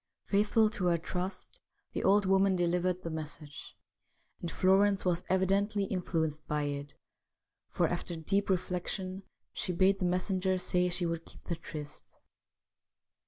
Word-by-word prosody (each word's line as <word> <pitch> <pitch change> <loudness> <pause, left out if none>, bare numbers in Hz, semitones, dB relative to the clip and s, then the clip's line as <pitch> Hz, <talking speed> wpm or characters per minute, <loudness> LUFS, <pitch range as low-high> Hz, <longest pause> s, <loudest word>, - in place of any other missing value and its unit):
Faithful 210 +2 +3
to 210 -3 -3
her 175 -1 +3
trust, 180 +3 -5 0.3
the - - -2
old 200 +1 +4
woman 190 0 +4
delivered 180 +1 +1
the 165 - -4
message, 150 -2 -7 0.6
and 170 - -3
Florence 195 +3 +3
was 180 -1 +1
evidently 195 +2 +2
influenced 160 -5 -2
by 150 0 0
it, 145 0 -4 0.7
for, - - +1
after 170 - -3
deep 195 +6 0
reflection, 185 +1 -2 0.3
she - - -2
bade 190 +2 +3
the 185 - 0
mes 180 +1 +1
senger 185 0 +1
say 180 0 +2
she 175 0 -1
would 165 -1 -2
keep - - -16
the 170 - -3
tryst. 150 -2 -8
180 Hz, 145 wpm, -31 LUFS, 170-195 Hz, 0.7 s, old